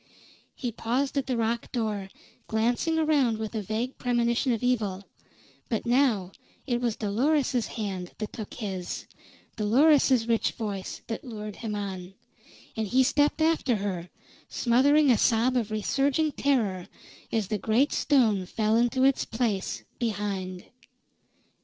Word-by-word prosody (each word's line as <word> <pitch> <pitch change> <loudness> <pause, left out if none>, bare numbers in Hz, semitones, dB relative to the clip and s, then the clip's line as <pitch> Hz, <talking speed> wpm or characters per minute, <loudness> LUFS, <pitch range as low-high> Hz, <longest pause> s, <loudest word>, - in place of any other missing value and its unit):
He 245 - -3
paused 245 +5 -1
at 275 -1 -1
the 255 -2 0
rock 230 +1 -1
door, 210 -5 -2 0.4
glancing 240 +9 +1
around 290 -8 +2
with 220 0 -5
a 220 - -2
vague 220 +6 -3
premonition 240 +1 +1
of 230 0 -1
evil; 210 -6 0 0.7
but 225 - -1
now 235 -7 +2 0.3
it 240 -3 -1
was 235 -3 0
Dolores's 250 +4 +1
hand 195 -5 -5
that 215 - -5
took 215 -3 -7
his; 190 -5 -5 0.5
Dolores's 255 +2 +4
rich 230 -1 +1
voice 200 -4 -5
that 225 - -5
lured 215 -4 -7
him 220 -3 -4
on; 190 -2 -5 0.6
and 220 -1 -2
he 260 +6 +4
stepped 295 +4 +2
after 315 -6 +2
her, 190 -4 -3 0.4
smothering 275 +4 +4
a 230 - +3
sob 235 +3 +3
of 230 -4 0
resurging 275 +8 +1
terror 220 -12 0 0.4
as 215 -4 -1
the 215 -1 -1
great 235 +9 +2
stone 220 -10 +2
fell 215 +3 +1
into 240 +2 +2
its 270 0 +3
place 225 -4 -2 0.2
behind. 195 -5 -3
230 Hz, 140 wpm, -27 LUFS, 210-255 Hz, 0.7 s, Dolores's